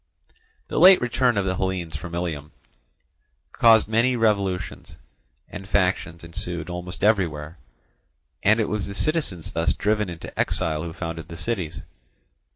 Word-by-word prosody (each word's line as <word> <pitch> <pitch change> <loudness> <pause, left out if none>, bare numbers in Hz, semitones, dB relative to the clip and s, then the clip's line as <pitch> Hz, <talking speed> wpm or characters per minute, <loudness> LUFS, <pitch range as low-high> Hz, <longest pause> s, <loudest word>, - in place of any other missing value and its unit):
The - - -2
late 185 +3 +9
return 125 -1 +1
of 100 - +1
the 95 -1 -1
Hellenes 95 -4 -2
from 85 +2 -6
Ilium 80 -4 -4 1.0
caused 115 -1 +5
many 115 +4 +2
revolutions, 100 -6 -1 0.5
and 95 +1 -9
factions 90 -4 0
ensued 85 0 -5
almost 90 +1 -6
everywhere; 85 -7 +1 0.8
and 110 +3 +4
it 110 - +1
was 105 -2 -2
the 100 - -7
citizens 145 - -1
thus 80 +1 +1
driven 105 -1 0
into 85 -1 -9
exile 80 -1 0
who 85 0 -5
founded 80 -2 -6
the 85 -2 -9
cities. 85 - -3
90 Hz, 140 wpm, -24 LUFS, 85-105 Hz, 1.0 s, late